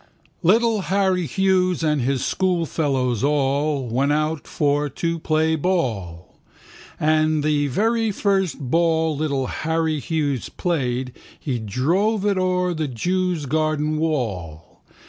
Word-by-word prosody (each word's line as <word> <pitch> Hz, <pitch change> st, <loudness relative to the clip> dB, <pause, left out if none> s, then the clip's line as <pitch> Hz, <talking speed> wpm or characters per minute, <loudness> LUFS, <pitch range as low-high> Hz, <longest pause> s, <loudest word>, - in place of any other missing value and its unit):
Little 220 Hz, +4 st, +3 dB
Harry 190 Hz, -2 st, +1 dB
Hughes 185 Hz, -2 st, +1 dB
and 150 Hz, -3 st, +1 dB
his 130 Hz, +1 st, 0 dB
schoolfellows 145 Hz, -, 0 dB
all 140 Hz, 0 st, +1 dB
Went 135 Hz, +5 st, +1 dB
out 155 Hz, 0 st, -1 dB
for 145 Hz, 0 st, 0 dB
to 165 Hz, +4 st, -2 dB
play 160 Hz, 0 st, +1 dB
ball. 110 Hz, -, -2 dB, 0.6 s
And 155 Hz, 0 st, +2 dB
the 145 Hz, -1 st, +1 dB
very 225 Hz, -, +1 dB
first 195 Hz, -6 st, 0 dB
ball 160 Hz, +3 st, +1 dB
little 140 Hz, -3 st, -1 dB
Harry 160 Hz, +1 st, -1 dB
Hughes 145 Hz, -4 st, -2 dB
played 130 Hz, -7 st, -2 dB, 0.3 s
He 130 Hz, -5 st, -3 dB
drove 175 Hz, -, 0 dB
it 200 Hz, -2 st, +2 dB
o'er 180 Hz, -1 st, +1 dB
the 155 Hz, -2 st, -2 dB
jew's 175 Hz, +5 st, -1 dB
garden 155 Hz, +1 st, 0 dB
wall. 100 Hz, -, -3 dB
155 Hz, 120 wpm, -22 LUFS, 135-180 Hz, 0.6 s, Little